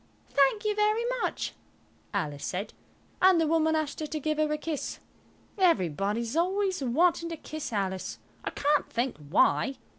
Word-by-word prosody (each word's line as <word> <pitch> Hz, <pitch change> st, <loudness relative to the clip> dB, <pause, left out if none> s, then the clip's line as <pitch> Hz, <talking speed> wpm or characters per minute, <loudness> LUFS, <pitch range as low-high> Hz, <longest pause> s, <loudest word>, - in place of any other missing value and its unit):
"Thank 285 Hz, +11 st, +3 dB
you 425 Hz, -, +2 dB
very 425 Hz, +2 st, +2 dB, 0.2 s
much," -, -, -2 dB, 0.6 s
Alice 150 Hz, -8 st, -2 dB
said, 195 Hz, +3 st, -3 dB, 0.5 s
and 370 Hz, -2 st, +6 dB
the 325 Hz, -, +3 dB
woman 320 Hz, 0 st, +2 dB
asked 310 Hz, -2 st, -2 dB
her 310 Hz, -, -3 dB
to 310 Hz, +1 st, -3 dB
give 310 Hz, +1 st, -1 dB
her 305 Hz, -1 st, +2 dB
a 300 Hz, -, +1 dB
kiss. 300 Hz, -1 st, -4 dB, 0.6 s
Everybody 205 Hz, -, +2 dB
is 235 Hz, +3 st, -4 dB
always 375 Hz, +1 st, +1 dB
wanting 335 Hz, +6 st, +2 dB
to 330 Hz, -, -5 dB
kiss 310 Hz, -3 st, -6 dB
Alice. 190 Hz, -3 st, -2 dB, 0.3 s
I -, -, -2 dB
can't 290 Hz, +1 st, +1 dB
think 240 Hz, +2 st, -1 dB
why. 155 Hz, -, +2 dB
300 Hz, 160 wpm, -28 LUFS, 230-335 Hz, 0.6 s, and